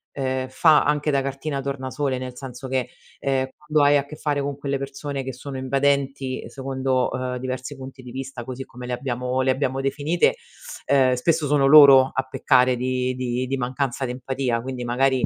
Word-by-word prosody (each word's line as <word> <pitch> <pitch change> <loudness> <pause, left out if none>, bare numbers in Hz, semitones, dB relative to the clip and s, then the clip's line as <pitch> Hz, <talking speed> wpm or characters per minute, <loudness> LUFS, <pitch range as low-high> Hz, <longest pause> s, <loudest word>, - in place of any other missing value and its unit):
ehm, 130 -1 -2
fa 155 +3 +5
anche 150 +1 0
da 140 -1 +2
cartina 140 +1 -3
tornasole, 135 0 -2
nel 130 -1 -6
senso 130 -1 -8
che, 130 -1 -1 0.3
ehm, 135 -1 0
quando 150 -1 +1
hai 145 - +5
a 140 - -1
che 150 - -10
fare 145 -2 -1
con 140 0 -3
quelle 140 -1 -2
persone 140 0 -5
che 130 -1 -5
sono 135 +2 -7
invadenti 135 0 0
secondo, 130 -1 -1
uhm, 125 0 -3
diversi 130 +2 -5
punti 130 -1 -10
di 125 - -10
vista, 135 -1 -6
così 130 +1 -6
come 125 +1 -10
le 125 - -3
abbiamo 125 0 -2
le 130 - +1
abbiamo 135 0 -1
definite, 145 - +1 0.5
ehm, 130 -2 +4
spesso 155 +4 +1
sono 140 -1 +3
loro 140 -3 +8
a 130 - 0
peccare 125 -1 +3
di 125 0 -1
di 125 0 -2
di 135 +1 -1
mancanza 130 +1 -2
d'empatia 125 -1 -2
quindi 125 -1 -5
magari, 130 +2 +2
130 Hz, 185 wpm, -23 LUFS, 130-140 Hz, 0.5 s, loro